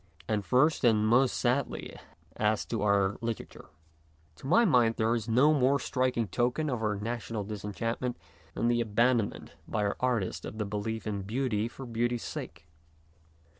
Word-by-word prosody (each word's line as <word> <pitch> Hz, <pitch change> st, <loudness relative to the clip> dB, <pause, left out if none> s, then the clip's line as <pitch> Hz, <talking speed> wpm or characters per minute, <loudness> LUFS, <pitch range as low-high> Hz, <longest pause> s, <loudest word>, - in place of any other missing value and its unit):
And 105 Hz, -2 st, 0 dB
first, 130 Hz, -, +3 dB
and 110 Hz, -3 st, +4 dB
most 125 Hz, +3 st, +3 dB
sadly, 125 Hz, +2 st, -1 dB, 0.4 s
as 105 Hz, 0 st, +1 dB
to 115 Hz, -, -3 dB
our 100 Hz, -1 st, +2 dB
litera 115 Hz, -1 st, -3 dB
ture. -, -, -15 dB, 0.7 s
To 130 Hz, -, -9 dB
my 230 Hz, +10 st, +5 dB
mind 120 Hz, -, +4 dB
there 110 Hz, +1 st, +1 dB
is 115 Hz, -1 st, -2 dB
no 135 Hz, +7 st, +5 dB
more 140 Hz, 0 st, +3 dB
striking 125 Hz, -5 st, 0 dB
token 125 Hz, -, 0 dB
of 120 Hz, -3 st, -2 dB
our 105 Hz, -1 st, 0 dB
national 115 Hz, 0 st, -4 dB
disenchantment 110 Hz, +4 st, -3 dB, 0.4 s
than 115 Hz, -, 0 dB
the 120 Hz, 0 st, +2 dB
abandonment 115 Hz, -3 st, 0 dB
by 105 Hz, -2 st, -1 dB
our 100 Hz, -, -1 dB
artists 120 Hz, -7 st, -1 dB
of 110 Hz, -, -7 dB
the 105 Hz, -, -1 dB
belief 105 Hz, +2 st, -4 dB
in 100 Hz, -2 st, -2 dB
beauty 110 Hz, +1 st, -1 dB
for 130 Hz, +3 st, -9 dB
beauty's 120 Hz, 0 st, -1 dB
sake. 85 Hz, +1 st, -7 dB
115 Hz, 165 wpm, -29 LUFS, 105-125 Hz, 0.7 s, my